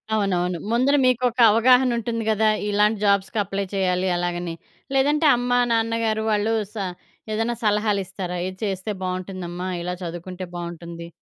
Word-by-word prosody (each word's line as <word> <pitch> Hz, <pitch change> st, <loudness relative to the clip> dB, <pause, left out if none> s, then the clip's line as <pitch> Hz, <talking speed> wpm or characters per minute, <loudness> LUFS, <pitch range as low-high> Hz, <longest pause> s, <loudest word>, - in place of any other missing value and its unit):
అవునవును. 180 Hz, -4 st, 0 dB
ముందర 255 Hz, +5 st, +3 dB
మీకొక 250 Hz, -1 st, +1 dB
అవగాహన 250 Hz, +3 st, +5 dB
ఉంటుంది 230 Hz, 0 st, -2 dB
కదా! 215 Hz, 0 st, +3 dB, 0.2 s
ఇలాంటి 210 Hz, +1 st, +2 dB
జాబ్స్‌కి 200 Hz, +1 st, +2 dB
అప్లై 195 Hz, 0 st, -3 dB
చెయ్యాలి? 185 Hz, -1 st, +1 dB
అలాగని. 175 Hz, -1 st, -2 dB, 0.4 s
లేదంటే 295 Hz, +4 st, +3 dB
అమ్మ, 245 Hz, 0 st, -2 dB, 0.2 s
నాన్నగారు 225 Hz, -1 st, 0 dB
వాళ్ళు 210 Hz, +2 st, +1 dB, 0.2 s
స -, -, -26 dB, 0.6 s
ఏదైనా 225 Hz, +2 st, 0 dB
సలహాలు 210 Hz, -1 st, +2 dB
ఇస్తారా? 180 Hz, -1 st, -5 dB
ఇది 185 Hz, 0 st, -7 dB
చేస్తే 195 Hz, +1 st, -3 dB
బాగుంటుందమ్మా 185 Hz, -1 st, -4 dB
ఇలా 180 Hz, +1 st, -3 dB
చదువుకుంటే 175 Hz, +2 st, -6 dB
బాగుంటుంది. 170 Hz, -1 st, -7 dB
200 Hz, 135 wpm, -23 LUFS, 180-225 Hz, 0.6 s, అవగాహన